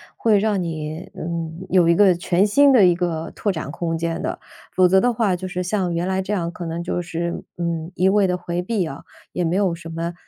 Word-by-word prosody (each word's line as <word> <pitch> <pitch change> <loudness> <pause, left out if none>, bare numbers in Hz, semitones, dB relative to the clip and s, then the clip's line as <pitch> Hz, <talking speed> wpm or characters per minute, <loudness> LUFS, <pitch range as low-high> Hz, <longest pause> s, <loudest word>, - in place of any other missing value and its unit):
会 220 -3 +3
让 205 -2 +1
你， 160 0 -5
嗯， 165 +1 -5
有 175 -2 +4
一 170 - +5
个 195 -1 +6
全 175 +2 +1
新 280 +7 +5
的 220 -8 +6
一 180 - +5
个 165 -2 -2
拓 205 - 0
展 155 -5 -5
空 165 0 -2
间 165 +1 -2
的。 - - -3 0.4
否 185 -1 +5
则 190 +1 +4
的 245 0 +3
话， 215 -5 +1
就 185 +1 -5
是 180 0 -3
像 185 -1 -1
原 175 +2 -1
来 190 0 0
这 190 - -5
样， 170 -5 -1
可 175 -1 -7
能 165 +1 -4
就 175 - -2
是， 170 0 -4
嗯， 170 -1 -3
一 185 - +2
味 200 0 +4
地 180 0 0
回 175 0 -3
避 195 -2 -1
啊， 140 -3 -7 0.3
也 180 - -1
没 170 +1 0
有 195 -3 +2
什 165 -1 -8
么 165 +1 -4
175 Hz, 255 characters per minute, -21 LUFS, 170-190 Hz, 0.4 s, 个